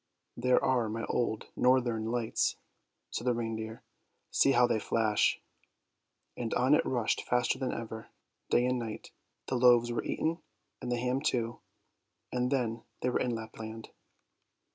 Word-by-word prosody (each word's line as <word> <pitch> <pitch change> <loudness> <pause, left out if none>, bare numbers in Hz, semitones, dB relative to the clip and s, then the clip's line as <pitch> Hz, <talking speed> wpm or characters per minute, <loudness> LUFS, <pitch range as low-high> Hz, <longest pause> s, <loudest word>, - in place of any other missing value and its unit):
" - - -52
There 125 0 +5
are 125 -4 +2
my 115 +1 -3
old 110 -3 -1
northern 125 -3 +2
lights," 115 0 0 0.6
said 120 - -3
the 125 - +3
reindeer; 110 -1 -4 0.5
"see 135 - +4
how 125 -1 +6
they 115 -2 +1
flash! 110 -1 +2 0.5
" - - -51
and 115 -2 -3
on 130 +3 +4
it - - +5
rushed 120 -4 +1
faster 125 +1 +1
than 130 - -1
ever, 110 -1 -6 0.4
day 120 - +4
and 125 0 +1
night. 110 -2 -6 0.4
The 130 - 0
loaves 120 -1 +5
were 120 - -1
eaten, 165 +2 -1 0.4
and 125 - -3
the 120 - +1
ham 125 +2 0
too, 120 -5 -1 0.7
and 125 0 0
then 115 -4 0 0.2
they 125 - +1
were - - +1
in 120 -2 0
Lapland. 110 0 -7
120 Hz, 160 wpm, -31 LUFS, 115-125 Hz, 0.7 s, how